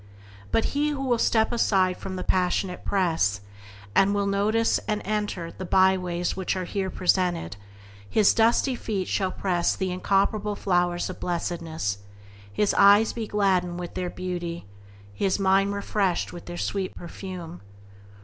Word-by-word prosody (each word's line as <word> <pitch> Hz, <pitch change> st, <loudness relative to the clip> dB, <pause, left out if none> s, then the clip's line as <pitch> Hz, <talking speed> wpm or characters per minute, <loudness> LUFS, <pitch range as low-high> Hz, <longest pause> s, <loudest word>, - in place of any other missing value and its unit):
But 225 Hz, -, +2 dB
he 295 Hz, +1 st, +1 dB
who 285 Hz, -2 st, -3 dB
will 245 Hz, -3 st, +1 dB
step 220 Hz, 0 st, +2 dB
aside 190 Hz, -6 st, +2 dB
from 190 Hz, 0 st, -6 dB
the 185 Hz, -, -4 dB
passionate 180 Hz, 0 st, 0 dB
press, 165 Hz, -, +1 dB, 0.5 s
and 200 Hz, -, +4 dB
will 200 Hz, 0 st, +1 dB
deign 200 Hz, -, 0 dB
to 200 Hz, -, 0 dB
notice 220 Hz, +3 st, +2 dB
and 210 Hz, -1 st, 0 dB
to -, -, -13 dB
enter 205 Hz, -5 st, -2 dB
the -, -, -8 dB
byways 180 Hz, -1 st, +2 dB
which 190 Hz, 0 st, -2 dB
are 185 Hz, -, -2 dB
here 190 Hz, +1 st, -2 dB
presented, 180 Hz, -, 0 dB, 0.5 s
his 210 Hz, -, +4 dB
dusty 235 Hz, +4 st, +3 dB
feet 205 Hz, -6 st, -3 dB
shall 190 Hz, -2 st, 0 dB
press 180 Hz, -3 st, 0 dB
the 190 Hz, -1 st, -2 dB
incomparable 200 Hz, +3 st, 0 dB
flowers 175 Hz, -3 st, 0 dB
of -, -, -11 dB
blessedness, 165 Hz, -, -3 dB, 0.5 s
his 200 Hz, -, +1 dB
eyes 205 Hz, +2 st, +6 dB
be 225 Hz, -2 st, -4 dB
gladdened 185 Hz, -4 st, +1 dB
with 175 Hz, -1 st, -6 dB
their 180 Hz, -1 st, -3 dB
beauty, 175 Hz, -2 st, -4 dB
and -, -, -22 dB, 0.5 s
his 195 Hz, -2 st, +1 dB
mind 195 Hz, 0 st, +3 dB
refreshed 200 Hz, -3 st, -1 dB
with 175 Hz, -, -9 dB
their 175 Hz, 0 st, -6 dB
sweet 195 Hz, 0 st, -3 dB
perfume. 175 Hz, -1 st, -8 dB
190 Hz, 160 wpm, -25 LUFS, 175-205 Hz, 0.5 s, eyes